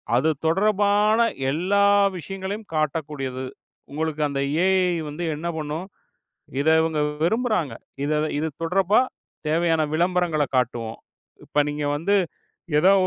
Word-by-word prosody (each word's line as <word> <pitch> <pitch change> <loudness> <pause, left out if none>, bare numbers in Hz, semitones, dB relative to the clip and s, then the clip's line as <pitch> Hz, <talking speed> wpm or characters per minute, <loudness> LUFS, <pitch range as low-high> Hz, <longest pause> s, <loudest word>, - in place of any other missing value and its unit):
அது 145 +6 +3 0.2
தொடர்பான 205 +4 +3 0.3
எல்லா 190 +6 +2 0.3
விஷயங்களையும் 195 +4 -6
காட்டக்கூடியது. 145 -4 -2 0.5
உங்களுக்கு 155 0 -2
அந்த 140 -1 -2 0.2
AI 190 +1 +4 0.4
வந்து 160 +4 -5
என்ன 165 +3 -5
பண்ணும், 155 +4 -4 0.7
இதை 160 +2 +4
இவங்க 160 -2 0 0.2
விரும்புகிறார்கள். 215 - 0 0.6
இது 160 +1 0 0.2
தொடர்பா 195 +5 +3 0.5
தேவையான 165 0 +2
விளம்பரங்கள 175 -3 +1
காட்டுவோம். 120 -3 -1 0.5
இப்போ 150 - +1
நீங்க 145 0 -3
வந்து 200 +7 +1 0.6
ஏதோ 185 +5 +6
165 Hz, 105 wpm, -24 LUFS, 150-195 Hz, 0.7 s, ஏதோ